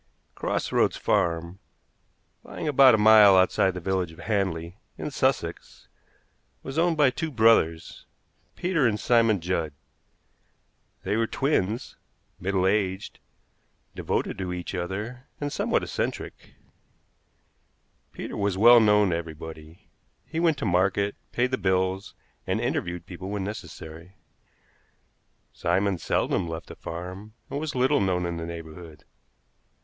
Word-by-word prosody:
Cross - - -2
Roads - - +2
Farm, 85 +2 0 0.8
lying - - -6
about 135 -4 +7
a - - +1
mile 105 -2 +7
outside 95 0 +3
the - - -4
village 95 -1 -1
of 80 - -15
Hanley, 95 -3 -2 0.2
in - - -5
Sussex, 130 -11 -2 0.7
was 135 +4 -3
owned 170 -1 +2
by 145 -4 +5
two 160 +4 -3
brothers, 110 - +2 0.5
Peter 170 -7 +1
and 105 -2 -1
Simon 115 -4 +3
Judd. 85 -3 -2 1.3
They - - -1
were 115 0 +1
twins, 120 -6 -1 0.4
middle 95 0 0
aged, 95 -1 -1 0.7
devoted - - -2
to 95 -2 -3
each 90 +1 -5
other, 105 +8 -5
and 145 -1 -3
somewhat - - 0
eccentric. - - -5 1.6
Peter - - -7
was 100 -2 -1
well 120 +4 +8
known 105 -3 +4
to - - +1
everybody. 80 0 -9 0.3
He 160 - -4
went 165 -3 +2
to - - -3
market, 95 +2 +1 0.2
paid 125 +1 0
the 130 - -1
bills, 95 0 0 0.3
and - - 0
interviewed 85 -1 -2
people 95 +1 -8
when 100 -1 -3
necessary. 90 -3 -8 1.4
Simon 95 -2 0
seldom 90 +1 0
left 80 0 -6
the - - -11
farm, 90 +6 -8 0.2
and 140 - -2
was 150 -2 -4
little 130 0 +2
known 90 -2 0
in 85 -1 -3
the 85 0 -5
neighborhood. 85 -1 -10
95 Hz, 130 wpm, -26 LUFS, 85-115 Hz, 1.6 s, well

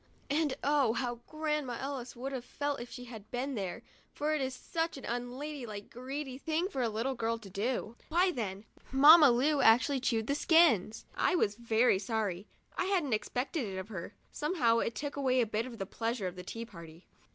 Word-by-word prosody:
And 295 -2 +1
oh, 280 -5 +3
how 240 -1 -2
Grandma 300 -5 -2
Ellis 265 -2 -5
would 260 +3 -5
have 260 -3 -4
felt 285 +1 -3
if 240 - -8
she 250 - -8
had 220 -4 -10
been 260 +3 -2
there, 195 -6 -4 0.3
for 300 +1 -1
it 305 - 0
is 260 -1 -2
such 325 +4 -3
an 270 - -8
unladylike 245 -2 -5
greedy 265 +2 -5
thing 325 +5 -1
for 270 -10 -3
a 235 - +1
little 230 +5 -1
girl 230 -2 -1
to 205 -4 -12
do! 225 +3 -2
Why 355 +3 +3
then, 205 - -4 0.3
Mamma 295 +3 +9
Lu 275 +5 +3
actually 250 +5 +5
chewed 230 -3 0
the 280 - 0
skins! 290 - +4
I - - +2
was 210 - +2
very 230 -1 +2
sorry; 205 -3 -2 0.3
I - - 0
hadn't 355 - +1
expected 250 +7 -1
it 190 -1 -5
of 190 +3 -6
her. 190 -6 -7 0.2
Somehow 280 -8 +2
it 230 - -1
took 290 +2 -4
away 260 -2 +2
a 240 - +4
bit 220 +2 -2
of 235 -2 -9
the 195 - -3
pleasure 225 +1 -3
of 180 -1 -3
the 180 - -7
tea 230 +5 -6
party. 170 -5 -12
250 Hz, 200 wpm, -32 LUFS, 225-285 Hz, 0.3 s, Mamma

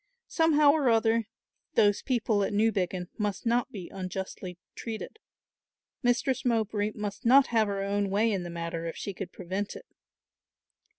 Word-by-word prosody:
Somehow 305 -3 +4
or 290 -4 +2
other 225 -1 +3 0.5
those 205 -1 +4
people 225 -5 +1
at - - -1
Newbiggin 195 -4 0
must 205 0 -2
not 240 +2 +1
be 190 -7 -7
unjustly 185 -1 -6 0.2
treated. 230 - -6 0.8
Mistress 250 +1 +1
Mowbray 215 -3 0
must 205 -2 -5
not 265 +3 +7
have 220 -2 +4
her 200 -1 -2
own 200 0 0
way 215 +4 +2
in 195 -3 -1
the 175 - -6
matter 170 0 -4
if 165 - -5
she 200 - -4
could 180 -1 -6
prevent 190 +3 -4
it. - - -10
210 Hz, 155 wpm, -29 LUFS, 195-235 Hz, 0.8 s, not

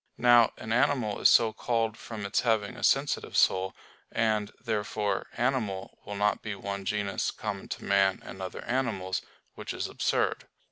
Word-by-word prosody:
Now 120 -2 +6
an 110 - -3
animal 120 -4 +2
is - - +7
so 115 -2 +5
called 115 -1 0
from 110 -3 -7
its 100 - +1
having 110 -1 +1
a 120 - -10
sensitive 140 +1 +1
soul; 95 0 +3 0.4
and, 110 -2 +1
therefore, 105 -3 -2
"animal" 115 -7 -1
will 105 - -4
not 105 +1 +1
be 105 -2 -4
one 100 0 -5
genus 100 -1 -1
common - - -5
to - - -6
man 100 -1 +3
and 95 - -8
other 95 - -6
animals, 110 -8 -1 0.3
which - - -6
is - - -2
absurd. - - 0
105 Hz, 160 wpm, -29 LUFS, 100-115 Hz, 0.4 s, is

